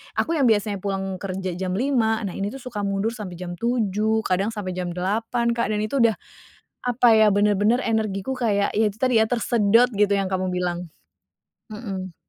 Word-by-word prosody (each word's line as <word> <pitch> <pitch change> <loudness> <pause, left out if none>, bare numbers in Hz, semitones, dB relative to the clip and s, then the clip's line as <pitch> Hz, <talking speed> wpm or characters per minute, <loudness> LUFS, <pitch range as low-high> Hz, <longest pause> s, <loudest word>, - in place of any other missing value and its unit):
aku 330 - 0
yang 285 - +1
biasanya 205 -2 +1
pulang 195 -1 -2
kerja 190 -1 -4
jam 185 -1 -2
5. 230 -3 +1
Nah 195 - -3
ini 195 - -2
tuh 270 - -8
suka 230 -5 -5
mundur 200 +3 -1
sampe 190 -6 -7
jam 175 -1 -6
7, 220 -1 0
kadang 185 +3 +1
sampe 205 -4 -5
jam 180 -1 -3
8 225 +6 -1
Kak, 235 -2 -1
dan 210 - 0
itu 235 +4 +1
udah 225 -2 +4 0.7
apa 245 0 +3
ya, 215 -1 +5
bener-bener 205 +3 +3
energiku 220 +1 -1
kayak, 210 -5 0
ya 220 +1 +3
itu 210 - -17
tadi 245 -4 +3
ya, - - +2
tersedot 230 -1 +3
gitu, 205 0 +2
yang 195 - 0
kamu 185 -1 -1
bilang, 180 -2 -3 0.8
mhm. 195 -5 -6
210 Hz, 185 wpm, -23 LUFS, 190-230 Hz, 0.8 s, ya